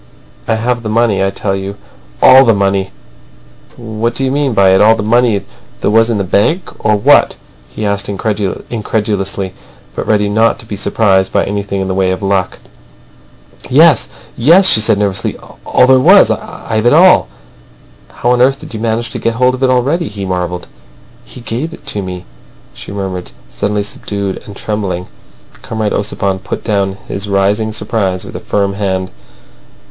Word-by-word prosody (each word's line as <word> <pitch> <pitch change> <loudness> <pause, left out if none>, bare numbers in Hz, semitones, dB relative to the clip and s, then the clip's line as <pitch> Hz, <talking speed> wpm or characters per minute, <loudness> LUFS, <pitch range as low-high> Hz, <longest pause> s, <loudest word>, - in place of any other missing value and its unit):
"I - - +1
have 120 +2 -1
the 110 - -5
money, 110 -3 +1
I 95 - +1
tell 95 0 -2
you. 95 +1 -6 0.5
All 130 +1 +8
the 115 -4 +3
money." 95 -1 0 0.9
"What 115 0 -3
do 135 - -1
you 130 - 0
mean 140 -3 0
by 100 -2 +5
it? 95 - +4
All 110 +2 +6
the 105 - -4
money 115 -2 +2 0.4
there - - +1
was 115 +1 +3
in 115 - 0
the 100 - -1
bank, 105 - 0
or 110 - +3
what?" 100 - +4 0.3
he 105 - -5
asked 100 -1 -2
incredulously, 100 -1 -3 0.4
but - - -4
ready 105 -1 +2
not 110 +3 +2
to - - -9
be 105 - -6
surprised 95 -2 +1
at 100 - +2
anything 100 -1 -3
in 95 - -2
the 95 - -2
way 95 0 +1
of 95 +2 -3
luck. 95 -2 0 1.1
"Yes, - - +5 0.3
yes!" 170 +10 +5
she 150 - +6
said 105 - +2
nervously. 100 -2 -1 0.3
"All - - +4
there 130 0 +5
was. 130 - +6
I've 110 +1 -3
it 120 - +4
all." 180 +4 +5 0.8
"How 120 - -1
on 125 0 +2
earth 135 +2 +3
did - - -10
you 110 - -5
manage 115 +1 -2
to - - -4
get 115 0 -1
hold 125 +1 +2
of 130 - -6
it 130 - +3
already?" 140 +7 +1
he 100 -1 -6
marvelled. 90 -1 -3 0.6
"He 125 - -11
gave 125 +8 -4
it - - -22
to 105 - -3
me," 90 -1 -7 0.5
she - - -10
murmured, 95 -3 -5 0.2
suddenly 105 0 -2
subdued 100 -1 -5
and 100 - -10
trembling. 100 -4 -3 0.6
Comrade 110 -2 -3
Ossipon 100 -2 -2
put - - -6
down 100 -3 -1
his 100 +1 -5
rising 100 +3 +1
surprise 105 -3 -2
with - - -10
a - - -4
firm 100 -1 -1
hand. 95 -2 -2
105 Hz, 180 wpm, -13 LUFS, 95-115 Hz, 1.1 s, All